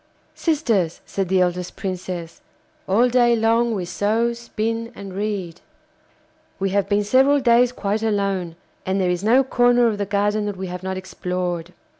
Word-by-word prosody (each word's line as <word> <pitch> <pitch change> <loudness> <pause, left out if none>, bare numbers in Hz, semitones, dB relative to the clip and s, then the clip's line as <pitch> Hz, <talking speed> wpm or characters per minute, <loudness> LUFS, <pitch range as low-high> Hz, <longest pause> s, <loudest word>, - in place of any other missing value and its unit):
'Sisters,' 230 - 0
said 195 -3 -3
the 190 0 +3
eldest 180 0 -1
Princess, 180 -3 -5 0.5
'all 225 +6 +4
day 240 -1 +4
long 230 +1 +2
we 185 -3 -3
sew, 220 +6 0
spin, 230 0 -3
and 195 -2 -8
read. 195 -4 -4 1.0
We 195 0 -1
have 200 0 0
been 205 0 +2
several 265 +7 +4
days 245 -1 +4
quite 210 -3 -2
alone, 200 -6 -1 0.3
and 190 +1 -1
there 180 -1 +1
is 180 +1 -2
no 245 +5 +5
corner 245 -1 +3
of 215 -3 0
the 200 - -2
garden 205 +1 0
that 205 -2 -4
we 190 - -4
have 180 -1 -6
not 190 0 -4
explored. 180 -2 -4
205 Hz, 165 wpm, -22 LUFS, 185-235 Hz, 1.0 s, no